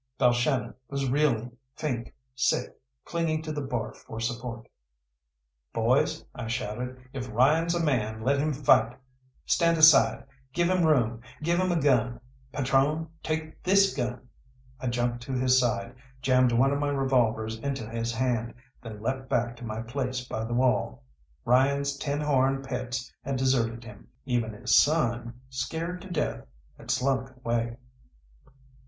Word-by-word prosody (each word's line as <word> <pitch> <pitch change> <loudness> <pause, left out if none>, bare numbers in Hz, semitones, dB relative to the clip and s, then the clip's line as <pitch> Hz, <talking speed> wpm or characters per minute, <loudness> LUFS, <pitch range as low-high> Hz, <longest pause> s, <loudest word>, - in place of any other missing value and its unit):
Balshannon 125 +1 +2 0.2
was 140 -1 -2
reeling, 125 -4 +1 0.2
faint, 125 -6 -3 0.2
sick, 130 - 0 0.3
clinging 160 -2 -1
to 155 - -4
the 150 -1 -3
bar 125 -4 -3
for 110 - -9
support. 115 0 -4 1.1
"Boys," - - +1
I 120 -2 -6
shouted, 125 +1 -3 0.2
"if 125 -3 -5
Ryan's 155 +9 +3
a 170 - 0
man, 110 -7 0
let 140 +3 +2
him 155 +2 +1
fight. 125 -4 +3 0.5
Stand 170 0 +3
aside, 140 -8 +6 0.3
give 175 +3 +2
him 180 -3 +3
room, 120 -6 +2 0.2
give 170 +2 +2
him 185 0 +1
a 170 - +2
gun. 125 -4 +2 0.3
Patrone, 140 +4 +1
take 155 0 -4
this 195 +1 +4
gun!" 125 -1 -3 0.5
I 130 - -4
jumped 120 0 -1
to 135 - -4
his 130 0 +4
side, 115 -1 -1 0.3
jammed 130 -1 +3
one 130 +4 +3
of 140 - -1
my 145 0 0
revolvers 115 -5 +1
into 135 -3 -3
his 115 +1 -2
hand, 120 -1 -1 0.3
then 110 -2 -9
leapt 130 +2 -2
back 120 0 0
to 120 - -11
my 110 0 -4
place 125 +1 -3
by 110 - -3
the 120 +1 -3
wall. 120 - +1 0.4
Ryan's 140 +3 +3
tin 145 +1 -2
horn 135 -2 +2
pets 130 -1 -4
had 140 - -2
deserted 120 -3 +1
him; 105 -3 -12 0.2
even 120 -4 -1
his 125 +3 +1
son, 120 -5 +2
scared 165 +7 -3
to 195 - -10
death, 160 -4 -2 0.3
had - - -14
slunk 130 0 +1
away. 120 -1 -2
130 Hz, 150 wpm, -27 LUFS, 120-140 Hz, 1.1 s, aside